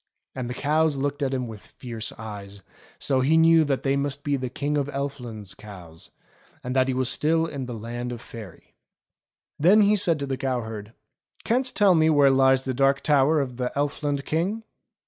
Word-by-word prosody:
And 125 -2 -4
the 125 - -5
cows 155 +1 +1
looked 145 +2 -2
at 135 -2 0
him 130 -2 -2
with 110 -3 -9
fiery 115 -3 -10 0.2
eyes, 100 -2 -9 0.3
so 135 -2 +1
he 150 +5 +3
knew 165 0 +6
that 135 -2 -1
they 135 0 +1
must 140 0 -2
be 145 -1 0
the 130 -2 -3
King 145 +4 -2
of 140 -2 0
Elfland's 125 -8 -5
cows, 90 -6 -12 0.5
and 125 +1 -4
that 130 0 +3
he 130 - 0
was 130 -1 0
still 160 +5 +1
in 140 -5 -5
the 120 - -5
Land 120 +2 -5
of 120 - -6
Faery. 110 -6 -12 0.9
Then 190 +8 +6
he 205 +1 +4
said 170 -5 +2
to 140 - -3
the 135 -1 -3
cow 130 -2 -1
herd: 110 -1 -8 0.5
"Canst 255 +2 0
tell 200 -3 +5
me 160 -1 +4
where 145 -3 +5
lies 130 0 +3
the 130 - -1
Dark 135 +2 +2
Tower 150 +1 +3
of 125 -4 -3
the 125 -1 -2
Elfland 145 -1 -1
King.?" 190 +8 -1
135 Hz, 200 wpm, -25 LUFS, 120-150 Hz, 0.9 s, knew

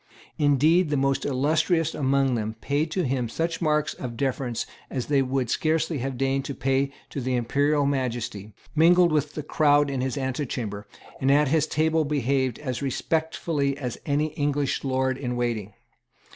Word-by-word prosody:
Indeed 150 +4 +4
the 145 - +1
most 135 0 +1
illustrious 155 +4 +1
among 135 -2 +1
them 110 -1 -2
paid 145 +5 0
to 180 +3 -1
him 125 -4 -1
such 165 +8 -2
marks 150 -2 +1
of 120 -3 -7
deference 130 -3 -1 0.2
as 130 -3 -3
they 140 -2 +2
would 130 -2 -1
scarcely 160 -1 0
have 130 0 -3
deigned 135 +1 0
to 140 - -4
pay 135 +1 0 0.2
to 140 - -4
the 130 0 -1
Imperial 140 +5 +1
Majesty, 120 -6 -2 0.2
mingled 175 +2 +5
with 150 -1 0
the 150 - -4
crowd 145 -1 +3
in 135 -2 -2
his 130 +2 -2
antechamber, 125 -6 -3 0.3
and 135 - +1
at 145 0 +4
his 155 +1 +2
table 160 +1 +1
behaved 135 -4 0
as 130 -5 -4
respectfully 145 0 -1
as 125 -5 -5
any 150 +2 +1
English 145 -2 -1
lord 130 -1 0
in 125 -3 -3
waiting. 115 -5 -2
140 Hz, 165 wpm, -25 LUFS, 130-150 Hz, 0.3 s, mingled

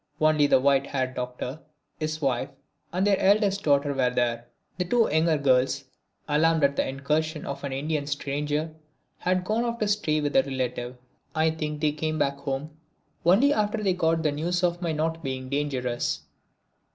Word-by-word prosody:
Only 155 -1 +4
the 130 - +5
white 140 0 +3
haired 130 -2 -2
Doctor, 125 +3 -5 0.4
his 155 0 -3
wife 130 0 0 0.4
and 185 +3 0
their 200 -2 +3
eldest 200 0 +3
daughter 145 -2 +2
were 130 -2 +2
there. 120 -1 -1 0.3
The 180 - +1
two 230 +5 +3
younger 160 +1 +3
girls, 135 0 +2 0.4
alarmed 160 +1 +3
at 140 0 +3
this - - 0
incursion 150 +4 -1
of 140 0 -5
an 140 - -3
Indian 145 +2 -2
stranger 150 +2 -2 0.5
had 185 0 0
gone 220 +4 +1
off 235 -1 -2
to 215 - 0
stay 200 -7 +1
with 145 -1 -2
a 135 - +7
relative. 125 -2 -3 0.4
I 160 0 +3
think 150 -2 -4
they 155 -1 +3
came 155 +1 -2
back 140 -2 0
home 140 +2 -4 0.6
only 245 +11 +5
after 210 -1 0
they 190 -2 +2
got 165 -2 +1
the 150 - +2
news 175 +5 -1
of 175 0 +1
my 170 -2 -1
not 160 +1 -2
being 130 -2 -4
dangerous. 125 - -1
150 Hz, 175 wpm, -26 LUFS, 135-165 Hz, 0.6 s, a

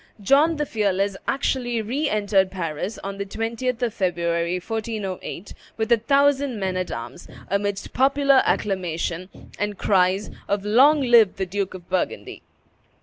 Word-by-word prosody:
John 285 +10 +4
the 300 -1 -1
Fearless 200 -4 0
actually 250 -3 0
re 265 +8 -1
entered 200 -2 +2
Paris 180 +2 -4
on 195 0 -5
the - - -1
20th 230 +4 -3
of 235 -3 0
February, 170 -1 0
1408, 210 -3 -5 0.2
with 220 0 -2
a 235 - +7
thousand 275 0 +2
men 190 -1 -2
at 185 -1 -2
arms, 115 +8 -7 0.2
amidst 200 0 -2
popular 275 +1 +4
acclamation, 180 -2 -2 0.3
and 205 -1 -2
cries 190 +1 +2 0.2
of 200 0 -1
"Long 275 +8 +5
live 235 -6 +5
the 190 - -2
Duke 195 +1 -3
of 180 -1 -11
Burgundy!" 185 0 -3
205 Hz, 145 wpm, -23 LUFS, 185-240 Hz, 0.3 s, a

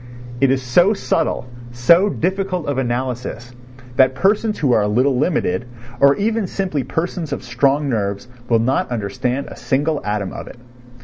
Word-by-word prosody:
It 135 - +4
is 130 0 +1
so 175 - +4
subtle, 165 -8 -1 0.3
so 170 +12 +4
difficult 190 -2 -2
of 145 -2 -1
analysis, 125 -1 -3 0.4
that 130 0 +4
persons 210 +5 +1
who 140 -4 +1
are 110 - +4
a 105 - +1
little 125 +6 +2
limited, 125 - 0 0.3
or 140 +1 +6
even 220 0 0
simply 180 -8 -2
persons 165 +4 -3
of - - -4
strong 135 +4 +1
nerves, 100 -3 -2 0.2
will 115 - +4
not 120 +4 0
understand 120 +4 -2
a - - -9
single 145 +2 -1
atom 105 -2 -2
of - - -7
it. - - -11
135 Hz, 165 wpm, -19 LUFS, 120-170 Hz, 0.4 s, or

